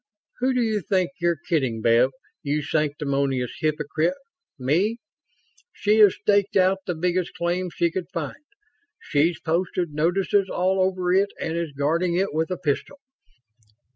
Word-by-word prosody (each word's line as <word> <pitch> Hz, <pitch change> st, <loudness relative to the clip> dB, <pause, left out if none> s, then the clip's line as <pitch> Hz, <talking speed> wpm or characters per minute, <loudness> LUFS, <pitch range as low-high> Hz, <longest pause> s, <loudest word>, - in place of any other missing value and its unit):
Who 255 Hz, +1 st, +1 dB
do 250 Hz, -, +2 dB
you 215 Hz, -2 st, 0 dB
think 185 Hz, -1 st, 0 dB
you're 170 Hz, -1 st, +1 dB
kidding, 130 Hz, -9 st, 0 dB
Bev, 115 Hz, +3 st, +4 dB, 0.3 s
you 150 Hz, +1 st, -1 dB
sanctimonious 140 Hz, -4 st, -1 dB
hypocrite 155 Hz, -, 0 dB, 0.4 s
me? 170 Hz, -, +1 dB, 0.8 s
She 215 Hz, +1 st, +2 dB
has 205 Hz, -3 st, +7 dB
staked 200 Hz, -1 st, +1 dB
out 190 Hz, +1 st, +3 dB
the 180 Hz, -, -1 dB
biggest 180 Hz, +2 st, -1 dB
claim 175 Hz, +1 st, -1 dB
she 170 Hz, 0 st, 0 dB
could 180 Hz, 0 st, -4 dB
find. 170 Hz, -, -5 dB, 0.6 s
She's 160 Hz, +2 st, +1 dB
posted 175 Hz, 0 st, -1 dB
notices 185 Hz, +5 st, +1 dB
all 185 Hz, +1 st, +1 dB
over 185 Hz, -1 st, +1 dB
it 195 Hz, +2 st, +3 dB
and 160 Hz, -, -3 dB
is 170 Hz, -2 st, -2 dB
guarding 165 Hz, +5 st, 0 dB
it 190 Hz, -1 st, 0 dB
with 160 Hz, +2 st, 0 dB
a 185 Hz, -, -2 dB
pistol. 150 Hz, -, -2 dB
175 Hz, 145 wpm, -24 LUFS, 150-190 Hz, 0.8 s, has